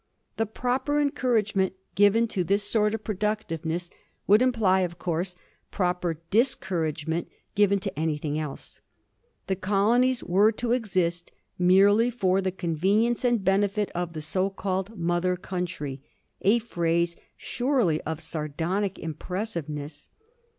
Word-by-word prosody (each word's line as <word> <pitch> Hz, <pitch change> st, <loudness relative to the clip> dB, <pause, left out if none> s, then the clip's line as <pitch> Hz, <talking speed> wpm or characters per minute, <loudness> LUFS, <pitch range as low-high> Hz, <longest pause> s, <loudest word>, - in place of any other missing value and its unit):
The 225 Hz, -, 0 dB
proper 255 Hz, +6 st, 0 dB
encourage 255 Hz, -7 st, +1 dB
ment 190 Hz, -1 st, +2 dB, 0.2 s
given 205 Hz, +3 st, +4 dB
to 185 Hz, -, 0 dB
this 200 Hz, +4 st, +1 dB
sort 210 Hz, +1 st, +2 dB
of 220 Hz, -, -7 dB
productiveness 180 Hz, -5 st, -2 dB, 0.3 s
would 210 Hz, +4 st, +5 dB
imply, 220 Hz, -7 st, +3 dB
of 175 Hz, -2 st, -2 dB
course, 175 Hz, +1 st, -2 dB, 0.3 s
proper 180 Hz, -3 st, -1 dB
discouragement 165 Hz, -, 0 dB, 0.3 s
given 200 Hz, -1 st, +4 dB
to 195 Hz, -6 st, -4 dB
anything 155 Hz, -1 st, -1 dB
else. 150 Hz, -3 st, -7 dB, 0.6 s
The 190 Hz, -, 0 dB
colonies 230 Hz, +7 st, +2 dB
were 200 Hz, +5 st, +4 dB
to 235 Hz, +2 st, -2 dB
exist 185 Hz, -8 st, 0 dB, 0.3 s
merely 200 Hz, +6 st, +5 dB
for 195 Hz, -5 st, +1 dB
the 190 Hz, -1 st, -1 dB
convenience 190 Hz, +8 st, +1 dB
and 240 Hz, -4 st, +2 dB
benefit 200 Hz, +2 st, +1 dB
of 175 Hz, -1 st, -3 dB
the 155 Hz, -2 st, -5 dB
so 185 Hz, +5 st, 0 dB
called 195 Hz, +2 st, -3 dB
mother 175 Hz, +1 st, +1 dB
country, 175 Hz, -7 st, -4 dB, 0.4 s
a 205 Hz, +5 st, +4 dB
phrase 170 Hz, -6 st, 0 dB, 0.2 s
surely 240 Hz, -, 0 dB
of 160 Hz, 0 st, -4 dB
sardonic 165 Hz, +5 st, -2 dB
impressiveness. 160 Hz, -4 st, -5 dB
190 Hz, 125 wpm, -26 LUFS, 170-215 Hz, 0.6 s, would